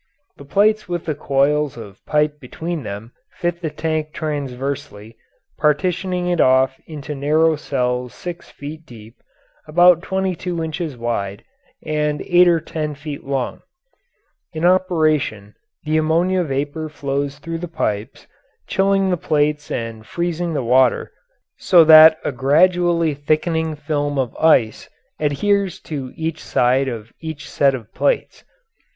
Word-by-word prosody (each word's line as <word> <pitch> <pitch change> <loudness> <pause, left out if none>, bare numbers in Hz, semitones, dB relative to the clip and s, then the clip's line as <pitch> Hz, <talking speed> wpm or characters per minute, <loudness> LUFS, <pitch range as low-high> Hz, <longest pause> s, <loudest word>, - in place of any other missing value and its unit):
The 140 - -12
plates 210 +6 +2
with 175 -1 -3
the 155 - -1
coils 145 0 0
of 105 -2 -11
pipe 150 0 +1
between 160 +5 -5
them 105 +1 -7 0.2
fit 175 0 -2
in - - -29
the 160 - -2
tank 155 0 -3
transversely, 135 -7 -5 0.4
partitioning 180 +4 0
it 175 -1 +1
off 130 +1 +3
into 150 -2 -6
narrow 155 +3 +2
cells 125 -4 -2
six 175 -1 -8
feet 155 +3 -9
deep, 115 -5 -15 0.5
about 175 +2 +5
twenty 190 -1 -1
two 175 -1 -4
inches 160 -3 -4
wide, 100 -4 -3 0.4
and 150 -1 -1
eight 180 0 +5
or 170 -1 +4
ten 155 -2 -4
feet 145 0 -7
long. 135 -2 -3 0.9
In 160 +2 -2
operation, 155 - +1 0.3
the 155 0 0
ammonia 170 +4 +2
vapour 145 +2 -3
flows 140 -1 -3
through 165 +2 -6
the 175 - -5
pipes, 105 -10 -3 0.4
chilling 195 0 +2
the 180 - +1
plates 150 -1 0
and 115 -2 -4
freezing 170 +5 -3
the 140 - -1
water 125 +1 +3 0.5
so 175 -2 +6
that 160 0 +9
a - - 0
gradually 165 +4 +2
thickening 155 +2 -1
film 145 -1 -2
of 130 -4 -1
ice 125 -9 +2 0.3
adheres 195 +6 0
to 135 -5 -6
each 160 0 -4
side 130 +2 +2
of 115 -2 -6
each 160 -2 -7
set 140 -1 +2
of 115 -3 -10
plates. - - -1
150 Hz, 140 wpm, -20 LUFS, 135-170 Hz, 0.9 s, that